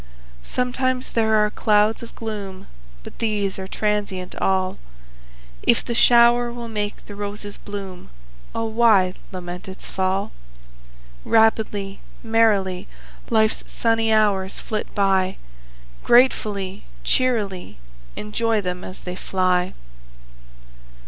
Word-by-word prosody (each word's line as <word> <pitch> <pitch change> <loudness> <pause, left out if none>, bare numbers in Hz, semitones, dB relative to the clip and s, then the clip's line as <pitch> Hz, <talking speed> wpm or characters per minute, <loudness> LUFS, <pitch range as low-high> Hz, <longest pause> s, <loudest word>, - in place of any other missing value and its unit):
Sometimes 255 - -1
there 220 -1 +3
are 210 0 +3
clouds 210 0 +2
of 235 - -10
gloom, 205 -4 -6 0.4
But - - -12
these 205 -4 -1
are 190 - -5
transient 200 -3 -2
all; 190 -1 0 0.8
If - - +2
the 235 - -2
shower 240 0 +5
will 240 0 -6
make 210 -2 -4
the 205 - -9
roses 205 0 -5
bloom, 195 -3 -8 0.5
O 225 - -1
why 220 -5 +4 0.2
lament 180 0 -7
its 190 0 -8
fall? 190 +1 -1 0.9
Rapidly, 215 -3 +2 0.2
merrily, 215 -5 +2 0.4
Life's 220 0 +2
sunny 225 -1 +1
hours 200 -3 +2
flit 215 -1 -3
by, 190 -2 +2 0.7
Gratefully, 210 -6 +3 0.2
cheerily 205 - 0 0.4
Enjoy 220 +1 0
them 180 -2 -4
as 185 - -9
they 180 0 -6
fly! 185 -1 0
210 Hz, 110 wpm, -22 LUFS, 190-225 Hz, 0.9 s, shower